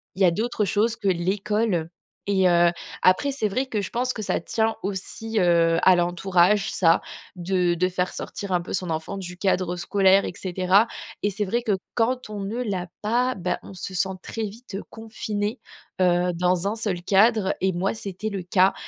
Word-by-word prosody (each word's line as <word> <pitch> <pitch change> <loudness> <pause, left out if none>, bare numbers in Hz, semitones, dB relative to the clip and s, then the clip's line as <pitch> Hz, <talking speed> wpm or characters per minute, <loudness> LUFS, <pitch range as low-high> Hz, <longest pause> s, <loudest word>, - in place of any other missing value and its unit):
il 195 - +1
y - - +8
a 175 - +5
d'autres 215 +3 -1
choses 220 +3 +1
que 205 - -4
l'école. 190 0 0 0.4
Et 190 -2 +3
heu, 175 0 +5 0.3
après, 185 +10 +3
c'est 265 -6 0
vrai 255 +7 -1
que 220 -5 -2
je 195 - -5
pense 250 +1 -1
que 220 - -5
ça 210 - -1
tient 225 +4 0
aussi, 205 +3 -3
heu, 170 -2 +3
à 185 - +6
l'entourage, 180 +3 +2
ça, 165 -2 +3 0.3
de 180 0 +1
de 185 +2 +1
faire 180 0 -2
sortir 200 -1 -6
un 180 -1 +2
peu 170 - -9
son 180 -3 -1
enfant 160 +5 -3
du 180 -2 -7
cadre 185 -2 0
scolaire, 195 +2 +3
et - - -4
cetera. 185 +4 +2 0.4
Et 205 - +2
c'est 205 +2 -2
vrai 235 +5 -1
que 220 - 0 0.2
quand 245 +1 0
on 210 -1 -5
ne 215 +5 -3
l'a 185 -6 -3
pas, 245 +4 +1
bah 180 -1 -2
on - - -11
se 190 0 -6
sent 190 +2 +1
très 225 - -5
vite, 215 +1 -7
heu, 195 - -4
confinée, 220 0 -4 0.4
heu, 180 0 +3
dans 180 +1 +1
un 210 - -1
seul 205 -6 -2
cadre 205 +1 +3
et 190 - +2
moi 190 +5 -1
c'était 205 0 -5
le 195 -3 -4
cas 185 +2 +3
195 Hz, 200 wpm, -24 LUFS, 180-215 Hz, 0.4 s, y